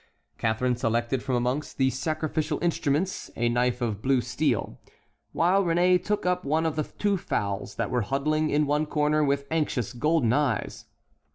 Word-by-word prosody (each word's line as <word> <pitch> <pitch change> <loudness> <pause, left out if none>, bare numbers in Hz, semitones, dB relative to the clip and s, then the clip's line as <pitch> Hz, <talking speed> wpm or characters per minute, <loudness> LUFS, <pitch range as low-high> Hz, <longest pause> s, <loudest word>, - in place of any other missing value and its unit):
Catharine 120 +3 +1
selected 120 +2 0
from 130 -1 -1
amongst 125 +5 -2
the 130 -1 +3
sacrificial 155 +2 -2
instruments 170 +1 0
a 120 0 +1
knife 125 +1 0
of 110 -4 -2
blue 130 +1 +2
steel, 120 - -1 0.5
while 185 +4 +3
Réné 180 +1 +3
took 210 -2 -1
up 180 0 +1
one 155 +3 +1
of 160 - 0
the 155 -1 -1
two 205 -1 +1
fowls 100 - -3
that - - -2
were 125 - +1
huddling 155 +6 0
in 150 +1 +2
one 150 +2 0
corner, 150 0 +1
with 140 -1 0
anxious, 145 -8 -1
golden 130 -2 +2
eyes. 140 -6 -1
145 Hz, 165 wpm, -26 LUFS, 125-155 Hz, 0.5 s, the